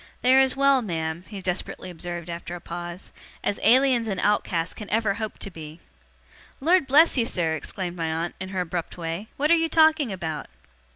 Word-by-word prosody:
'They 255 +1 +5
are 265 - +7
as 265 -1 +3
well, 275 -1 +4
ma'am,' 165 -4 -3
he 200 -2 -8
desperately 180 0 -3
observed 175 0 -6
after 170 0 -6
a - - -7
pause, 175 +1 -7 0.3
'as 200 - -1
Aliens 250 0 +4
and 195 -3 -2
Outcasts 180 -5 0
can 210 - -9
ever 220 -2 +1
hope 215 +1 -5
to 200 - -3
be.' 160 -1 -10 0.8
'Lord 335 +1 +3
bless 290 +1 +6
you, 230 - +2
sir!' 165 -7 0
exclaimed 175 +3 -5
my 165 -1 -1
aunt, 165 +2 -2
in 190 0 -5
her 190 -1 -2
abrupt 175 0 -4
way. 170 +5 -4
'What 300 +3 +2
are - - +8
you 325 0 +1
talking 315 -6 +4
about? 160 -5 -4
190 Hz, 195 wpm, -25 LUFS, 170-255 Hz, 0.8 s, are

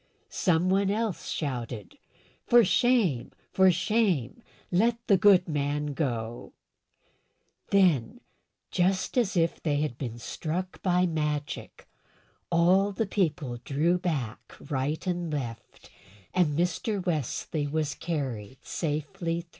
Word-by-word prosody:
Some 180 0 +2
one 195 0 +2
else 215 -2 -2
shouted, 120 - -4 0.5
"For 240 -2 +7
shame! 205 - +2 0.2
For 190 0 +5
shame! 185 - +1 0.3
let 230 +6 +3
the 200 - +5
good 190 -2 +5
man 145 -1 -1
go!" 120 -5 -3 1.2
Then, 175 -12 +3 0.5
just 185 +1 +1
as 220 -7 +1
if 165 0 +1
they 145 -3 0
had 150 -6 -3
been 120 -4 -4
struck 165 +9 -4
by 180 -1 +3
magic, 150 -3 -3 0.6
all 185 +4 +4
the 220 +3 -1
people 155 -11 -1
drew 155 +8 +1
back 140 - -3 0.2
right 140 +3 -1
and 175 -3 -2
left, 125 -6 -6 0.4
and 160 -5 +2
Mr. 180 +3 -1
Wesley 155 -2 -1
was 150 0 -1
carried 130 -8 -4
safely 165 +2 -2
through. 170 - -24
165 Hz, 115 wpm, -28 LUFS, 145-185 Hz, 1.2 s, For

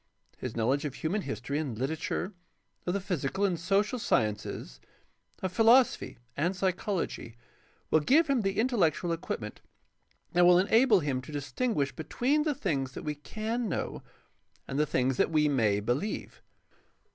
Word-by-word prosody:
His 125 - -5
knowledge 130 +6 +1
of 145 -3 -4
human 190 +7 -1
history 145 -5 -3
and 135 -8 -3
Hterature, 160 - -2 0.5
of 180 - +1
the - - +1
physical 190 0 -1
and 180 -4 0
social 200 +7 +1
sciences, 105 - -1 0.6
of 185 - -1
philosophy 230 - +4 0.2
and 170 +6 0
psychology, 185 - -2 0.6
will 155 - +6
give 285 - +4
him 275 -4 +2
the 195 -1 -1
intellectual 195 -8 +1
equipment 115 -10 -4 0.7
that 175 - +5
will 175 0 +7
enable 220 +2 +4
him 135 -4 -1
to 130 - -11
distinguish 145 - -1
between 250 - 0
the 300 -2 0
things 140 - -2
that - - -7
we 150 - -2
can 220 +9 -3
know - - -3 0.7
and 135 +1 -2
the 150 - +2
things 130 -1 +1
that - - +3
we 155 -2 +3
may 110 -8 +2
believe. 120 - -3
170 Hz, 150 wpm, -29 LUFS, 135-210 Hz, 0.7 s, will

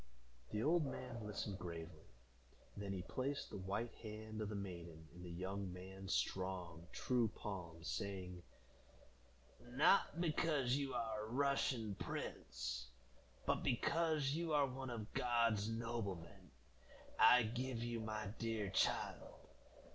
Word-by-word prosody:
The 105 - 0
old 165 +3 +5
man 125 -4 -4
listened 100 -1 -3
gravely; 85 -3 -6 0.7
then 100 -1 -3
he 95 -2 -2
placed 135 +6 -2
the - - -4
white 100 +5 -2
hand 110 0 -5
of 105 - -1
the 105 - -3
maiden 85 -5 -6
in 90 - -10
the 90 - -6
young 95 +2 -3
man's 95 +1 -6
strong, 90 -3 -1
true 125 -3 +2
palm, 90 -6 -5
saying, 90 -2 -3 1.3
"Not 150 +3 +5
because 150 -6 +3
you 140 -1 -1
are 110 -2 -1
a - - -8
Russian 130 -4 +2
prince, 65 +1 -3 0.6
but - - +2
because 155 +2 +2
you 165 +1 0
are 145 -1 +6
one 130 0 -4
of 110 -3 -5
God's 115 -4 +3
noblemen, 115 -6 -3 0.7
I 125 0 +9
give 120 +1 -1
you 120 -1 -1
my 110 -1 -2
dear 110 -3 0
child. - - 0
110 Hz, 130 wpm, -41 LUFS, 95-125 Hz, 1.3 s, I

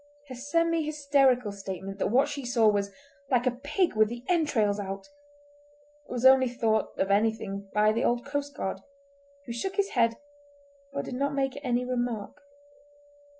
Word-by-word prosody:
Her - - -6
semi 330 +5 +1
hysterical 280 -6 +2
statement 195 0 -7
that - - +1
what 265 +7 +3
she 285 -1 -5
saw 240 -3 +3
was 200 -1 +2 0.4
"like 245 -1 +2
a 255 - +3
pig 295 - -1
with 215 0 +4
the 240 +1 -7
entrails 245 - +1
out" 195 -1 -5 1.0
was 245 0 -3
only 260 -1 +7
thought 225 -2 0
anything 200 0 0
of - - -27
by 210 0 +3
an 225 +4 +1
old 240 0 +1
coastguard, 285 -9 -3 0.7
who 235 - -5
shook 380 +11 -3
his 400 0 +1
head 230 -2 +2 0.8
but 280 - -4
did - - -6
not 280 +2 -1
make 270 -1 0
any 250 -1 0
remark. 245 +1 -3
245 Hz, 155 wpm, -28 LUFS, 215-280 Hz, 1.0 s, only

